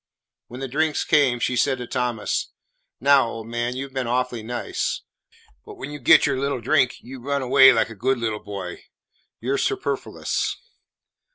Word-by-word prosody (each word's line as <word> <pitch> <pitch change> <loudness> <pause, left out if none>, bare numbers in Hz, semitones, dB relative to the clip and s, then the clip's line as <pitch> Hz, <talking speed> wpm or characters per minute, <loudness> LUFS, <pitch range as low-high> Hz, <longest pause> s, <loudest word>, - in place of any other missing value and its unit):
When 125 +2 -9
the 135 - -3
drinks 150 +4 0
came, 140 -6 +3
she 125 - 0
said 130 +2 +2
to 125 - -6
Thomas, 120 -3 -2 0.5
"Now, 135 -1 +5
old 115 -1 -7
man, 120 +1 -2
you 135 +1 -4
've 135 - -22
been 130 -2 -2
awfully 125 -1 -1
nice, 120 +2 -3 0.6
but - - -11
when 140 +3 -7
you 145 - -7
get 125 - +6
your 140 -2 0
little 140 -1 -1
drink, 130 0 +2
you 130 +1 -10
run 140 +1 -1
away 130 +1 +7
like 115 -1 +1
a - - -9
good 130 +6 0
little 110 -2 -3
boy. 100 -4 -7 0.6
You 130 +4 -1
're 140 - 0
superfluous." 400 -1 -2
125 Hz, 180 wpm, -23 LUFS, 120-135 Hz, 0.6 s, away